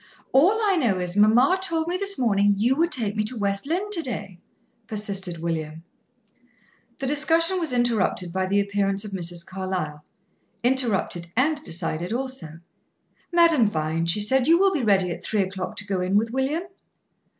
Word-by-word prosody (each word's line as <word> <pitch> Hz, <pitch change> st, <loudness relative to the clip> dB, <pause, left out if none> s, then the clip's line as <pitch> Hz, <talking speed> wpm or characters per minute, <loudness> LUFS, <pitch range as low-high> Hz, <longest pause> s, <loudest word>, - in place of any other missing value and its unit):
"All 365 Hz, +11 st, +4 dB
I 395 Hz, -3 st, +2 dB
know 235 Hz, -, +1 dB
is, 180 Hz, 0 st, -3 dB
mamma 240 Hz, -, +4 dB
told 330 Hz, -3 st, 0 dB
me 350 Hz, -, -1 dB
this 395 Hz, +1 st, 0 dB
morning 205 Hz, -4 st, +2 dB
you 240 Hz, +6 st, +2 dB
would 335 Hz, +3 st, +1 dB
take 220 Hz, -5 st, -1 dB
me 215 Hz, -, 0 dB
to 240 Hz, +3 st, -6 dB
West 200 Hz, +3 st, -1 dB
Lynne 375 Hz, +6 st, -2 dB
to 355 Hz, -5 st, +1 dB
day," 200 Hz, -, -6 dB, 0.5 s
persisted 200 Hz, -5 st, -2 dB
William. 160 Hz, -1 st, -4 dB, 1.1 s
The 270 Hz, -, -4 dB
discussion 325 Hz, +6 st, +2 dB
was 325 Hz, -5 st, 0 dB
interrupted 225 Hz, -8 st, 0 dB
by 190 Hz, 0 st, -1 dB
the 200 Hz, +2 st, +2 dB
appearance 200 Hz, 0 st, 0 dB
of 210 Hz, -, -7 dB
Mrs. 175 Hz, -2 st, -3 dB
Carlyle 185 Hz, -6 st, -4 dB, 0.6 s
interrupted 235 Hz, -9 st, 0 dB
and 295 Hz, +3 st, +1 dB
decided 170 Hz, -, -1 dB
also. 240 Hz, -11 st, -5 dB, 0.7 s
"Madame 335 Hz, -10 st, +4 dB
Vine," 160 Hz, -1 st, -2 dB
she 190 Hz, +5 st, +2 dB
said, 260 Hz, +5 st, +2 dB
"you 335 Hz, +1 st, +6 dB
will 390 Hz, +1 st, +3 dB
be 310 Hz, -, -1 dB
ready 195 Hz, -5 st, +2 dB
at -, -, -7 dB
three 210 Hz, -3 st, 0 dB
o'clock 190 Hz, -1 st, -5 dB
to 205 Hz, -, -4 dB
go 195 Hz, -2 st, -2 dB
in 185 Hz, +2 st, -1 dB
with 225 Hz, +2 st, 0 dB
William?" 270 Hz, +6 st, -1 dB
210 Hz, 175 wpm, -24 LUFS, 185-280 Hz, 1.1 s, you